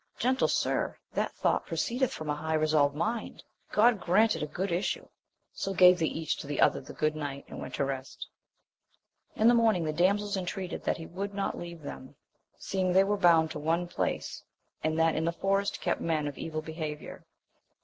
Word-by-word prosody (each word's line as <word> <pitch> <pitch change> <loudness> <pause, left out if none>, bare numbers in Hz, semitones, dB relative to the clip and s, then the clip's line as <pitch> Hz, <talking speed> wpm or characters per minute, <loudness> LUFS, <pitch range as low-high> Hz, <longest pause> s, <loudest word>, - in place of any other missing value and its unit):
Gentle 260 +2 +2
sir, - - 0 0.2
that - - 0
thought - - 0
proceedeth 255 0 0
from 155 - -6
a 150 - 0
high 160 +1 -2
resolved 155 -2 +3
mind: 220 +8 -3 0.3
God 220 0 +4
grant 215 +5 +3
it - - -5
a 150 - -2
good 180 +5 -3
issue! 175 +3 -1 0.5
So 195 0 -3
gave 180 0 +7
they 160 - +2
each 160 -1 -2
to 145 -1 -5
other - - +3
the 135 - -11
good 155 0 0
night, 140 -2 -5
and - - -8
went - - -6
to 140 - 0
rest. 135 -1 -5 1.1
In 220 - +3
the 240 - +7
morning 225 -7 +3
the 155 -1 -1
damsels 200 +5 +2
intreated 185 0 -4
that - - +1
he 165 - -8
would 200 +4 -5
not 200 - -1
leave 170 -2 -8
them, 130 -1 -8 0.4
seeing 185 -1 -1
they 190 +1 +6
were 205 +1 +1
bound 165 -4 +4
to - - -5
one 165 +3 0
place, - - -3 0.4
and 155 0 0
that 165 0 +3
in 160 - 0
the 170 - +1
forest 195 +3 0
kept - - -1
men 155 -3 0
of 145 - -5
evil 155 -1 -4
behaviour. 155 -2 -6
170 Hz, 195 wpm, -29 LUFS, 155-195 Hz, 1.1 s, gave